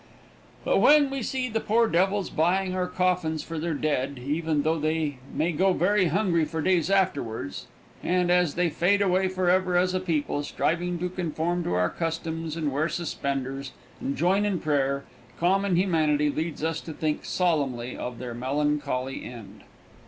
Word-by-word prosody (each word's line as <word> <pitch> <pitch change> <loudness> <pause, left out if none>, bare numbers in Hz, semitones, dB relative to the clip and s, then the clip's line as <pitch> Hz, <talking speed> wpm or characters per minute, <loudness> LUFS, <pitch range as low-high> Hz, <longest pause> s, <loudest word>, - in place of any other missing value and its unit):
But - - +3
when 290 -2 +6
we 275 -1 -3
see 255 +2 -2
the 225 -2 -1
poor 230 +2 +2
devils 195 +1 +1
buying 185 +4 +1
our 185 -1 -1
coffins 180 -3 0
for 165 -1 -5
their 165 0 -2
dead, 140 -2 -1
even 150 +3 -1
though 160 +1 +1
they 155 -3 -1
may 160 +4 0
go 185 +4 +2
very 190 +2 +2
hungry 170 -1 +2
for 160 +1 -3
days 175 +1 +2
afterwards, 140 - -1 0.3
and, 180 0 +1
as 180 -4 +3
they 175 -1 +1
fade 200 +6 +2
away 190 0 +2
forever 185 -1 +2
as 180 +1 +2
a 185 - +1
people, 155 -5 -1
striving 175 +4 -1
to 180 +2 -2
conform 175 0 -2
to - - -1
our 90 0 +1
customs 165 -1 -3
and 155 -3 -1
wear 150 +5 0
suspenders 135 -5 -3 0.3
and 140 - -2
join 190 +5 +2
in 205 -3 0
prayer, 140 -2 0 0.4
common 190 +2 +2
humanity 155 -5 +2
leads 155 0 -3
us 160 0 -1
to 160 - -7
think 155 0 -2
solemnly 140 -9 0
of 125 -1 -5
their 120 -1 -6
melancholy 135 0 -1
end. 115 -4 -10
165 Hz, 165 wpm, -26 LUFS, 145-185 Hz, 0.4 s, when